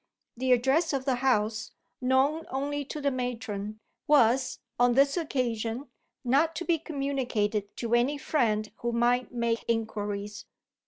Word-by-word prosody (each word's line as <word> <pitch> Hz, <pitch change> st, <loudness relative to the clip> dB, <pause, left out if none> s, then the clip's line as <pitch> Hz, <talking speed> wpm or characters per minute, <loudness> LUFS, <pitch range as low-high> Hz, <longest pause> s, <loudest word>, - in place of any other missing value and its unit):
The 255 Hz, +2 st, 0 dB
address 270 Hz, +7 st, +3 dB
of 265 Hz, -1 st, -1 dB
the 260 Hz, -3 st, +1 dB
house 220 Hz, -4 st, 0 dB, 0.3 s
(known 265 Hz, +5 st, +2 dB
only 285 Hz, +2 st, -2 dB
to 300 Hz, -, -6 dB
the 280 Hz, -1 st, +1 dB
matron) 225 Hz, -5 st, -4 dB, 0.3 s
was, 260 Hz, -2 st, +4 dB, 0.2 s
on 245 Hz, 0 st, +5 dB
this 275 Hz, +1 st, +4 dB
occasion, 250 Hz, -5 st, -2 dB, 0.3 s
not 285 Hz, +6 st, +2 dB
to 350 Hz, -, -4 dB
be 335 Hz, -2 st, +2 dB
communicated 250 Hz, -, -2 dB
to 235 Hz, -1 st, -2 dB
any 250 Hz, +5 st, +3 dB
friend 220 Hz, -8 st, 0 dB
who 235 Hz, -, -2 dB
might 245 Hz, +1 st, +2 dB
make 235 Hz, -2 st, -1 dB
inquiries. 210 Hz, -2 st, -3 dB
250 Hz, 140 wpm, -28 LUFS, 225-275 Hz, 0.3 s, on